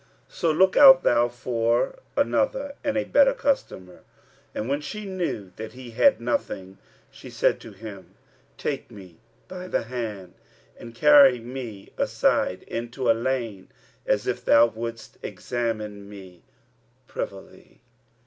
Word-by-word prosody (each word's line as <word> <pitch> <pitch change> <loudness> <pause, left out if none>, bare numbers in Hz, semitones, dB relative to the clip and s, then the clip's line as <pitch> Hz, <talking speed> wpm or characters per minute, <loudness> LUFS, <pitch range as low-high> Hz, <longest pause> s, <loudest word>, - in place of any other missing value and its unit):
So 170 - -1
look 185 +4 +3
out 270 -2 +9
thou 120 0 +3
for 120 - -1 0.2
another - - 0
and 280 -2 -1
a 270 - +1
better 280 -1 +4
customer." 95 - -2 0.5
And 110 - -3
when 140 +2 -1
she 210 +8 -7
knew 175 - -4
that 110 0 -7
he 125 -2 -10
had 270 - +4
nothing, 95 - -3 0.3
she - - -12
said - - +1
to 115 - -11
him, 100 -1 -11 0.4
"Take - - -4
me 95 -5 -13 0.3
by 185 0 -8
the - - -1
hand 110 -6 -6 0.4
and 115 0 -12
carry 140 -3 +7
me 120 -4 -8
aside - - +1
into 120 +2 -4
a - - +7
by 115 - -6
lane, 115 -6 -3 0.4
as - - +1
if - - -2
thou 115 +1 +6
wouldst 115 0 -7
examine 110 -4 -4
me 95 -4 -12 0.6
privily." 100 -4 -8
120 Hz, 140 wpm, -25 LUFS, 105-150 Hz, 0.6 s, out